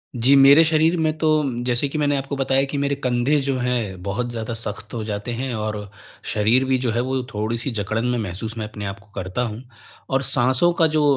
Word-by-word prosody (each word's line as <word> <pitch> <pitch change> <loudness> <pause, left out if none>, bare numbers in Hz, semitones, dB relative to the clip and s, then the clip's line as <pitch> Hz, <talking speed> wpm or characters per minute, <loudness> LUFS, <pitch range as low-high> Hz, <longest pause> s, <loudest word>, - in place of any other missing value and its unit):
जी। 125 +4 +4
मेरे 140 +3 +8
शरीर 160 +1 +3
में 155 -1 0
तो 155 - 0 0.2
म 120 -3 -3
जैसे 125 +3 +1
कि 155 - -4
मैंने 145 -1 +1
आपको 135 +1 -3
बताया 135 0 +2
कि 145 - -2
मेरे 140 0 0
कंधे 125 +3 +2
जो 135 0 -1
हैं 120 -7 -2
बहुत 110 +5 -2
ज़्यादा 115 -1 -4
सख्त 105 -2 -5
हो 115 -2 -3
जाते 105 +2 -4
हैं 125 +2 -3
और, 105 -2 -4 0.4
शरीर 110 +5 +3
भी 130 0 +2
जो 125 -2 -1
है 120 +2 0
वो 130 +1 -1
थोड़ी-सी 115 +5 -2
जकड़न 110 +1 -2
में 125 0 0
महसूस 110 +3 -5
मैं 110 -1 -3
अपने 105 -1 -7
आपको 100 0 -7
को 105 - -28
करता 95 +4 -3
हूँ 115 0 -4 0.5
और 135 0 +1
साँसों 130 +6 +3
का 165 - +6
जो 155 -1 +1
120 Hz, 225 wpm, -22 LUFS, 110-135 Hz, 0.5 s, मेरे